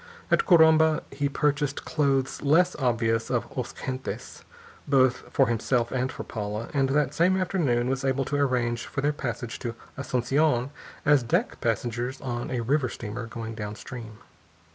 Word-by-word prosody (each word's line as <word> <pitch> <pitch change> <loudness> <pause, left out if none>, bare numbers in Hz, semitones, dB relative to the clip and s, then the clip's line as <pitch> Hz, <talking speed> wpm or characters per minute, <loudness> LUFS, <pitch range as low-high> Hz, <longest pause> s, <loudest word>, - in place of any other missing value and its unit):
At - - +3
Corumba 160 -2 +6
he 140 +1 -1
purchased 145 0 0
clothes 135 -3 0
less 170 +6 +3
obviously 115 -4 +1
of - - 0
os - - -3
gentes, 130 0 -5 0.4
both 130 -3 +2
for 135 - +4
himself 120 0 0
and 130 0 -1
for - - -6
Paula, 105 +1 -4
and 135 -2 +2
that 145 0 +1
same 180 +4 +3
afternoon 155 -11 +1
was 135 +1 -1
able 135 0 +1
to 145 - -2
arrange 125 -4 0
for 135 - -3
their 145 +2 +1
passage 120 -4 -4
to 115 -2 -4 0.2
Asunción 135 0 +1 0.3
as 145 -2 +5
deck 120 - -1
passengers 120 +3 -1
on 120 -3 -4
a 125 -2 -1
river 130 +2 +1
steamer 115 +2 -6
going 115 0 -6
downstream. 110 +1 -7
130 Hz, 155 wpm, -26 LUFS, 120-145 Hz, 0.4 s, Corumba